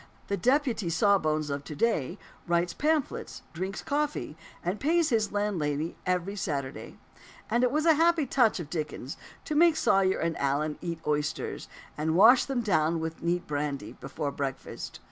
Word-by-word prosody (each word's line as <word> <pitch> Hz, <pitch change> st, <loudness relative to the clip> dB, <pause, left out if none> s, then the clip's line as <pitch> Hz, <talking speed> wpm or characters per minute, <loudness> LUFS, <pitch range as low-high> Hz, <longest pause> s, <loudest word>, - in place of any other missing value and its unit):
The 200 Hz, -, +1 dB
"deputy 250 Hz, -, +1 dB
sawbones" 155 Hz, -4 st, +2 dB
of 140 Hz, 0 st, -3 dB
to 150 Hz, -, -7 dB
day 175 Hz, -, 0 dB, 0.3 s
writes 170 Hz, 0 st, +1 dB
pamphlets, 305 Hz, -2 st, -1 dB
drinks 190 Hz, +4 st, -4 dB
coffee, 295 Hz, -, -2 dB, 0.3 s
and 185 Hz, +4 st, -1 dB
pays 330 Hz, +2 st, +2 dB
his 220 Hz, -5 st, +1 dB
landlady 165 Hz, -7 st, -1 dB
every 185 Hz, +2 st, 0 dB
Saturday. 140 Hz, -9 st, -4 dB, 0.5 s
And 240 Hz, +2 st, +3 dB
it 250 Hz, -, +4 dB
was 305 Hz, +3 st, 0 dB
a 325 Hz, -, +7 dB
happy 330 Hz, 0 st, +3 dB
touch 235 Hz, -6 st, +2 dB
of 160 Hz, -3 st, -7 dB
Dickens 150 Hz, -3 st, -4 dB, 0.3 s
to 310 Hz, -, -3 dB
make 330 Hz, +1 st, +5 dB
Sawyer 190 Hz, -8 st, +3 dB
and 165 Hz, 0 st, -1 dB
Allen 145 Hz, +2 st, 0 dB
eat 170 Hz, -1 st, -3 dB
oysters, 150 Hz, 0 st, -2 dB, 0.3 s
and 160 Hz, +1 st, 0 dB
wash 230 Hz, +7 st, +7 dB
them 265 Hz, -3 st, -1 dB
down 165 Hz, -6 st, +1 dB
with 160 Hz, 0 st, -5 dB
neat 175 Hz, +1 st, 0 dB
brandy, 145 Hz, -1 st, -3 dB
before 140 Hz, +1 st, -5 dB
breakfast. 135 Hz, -1 st, -5 dB
180 Hz, 160 wpm, -28 LUFS, 155-245 Hz, 0.5 s, a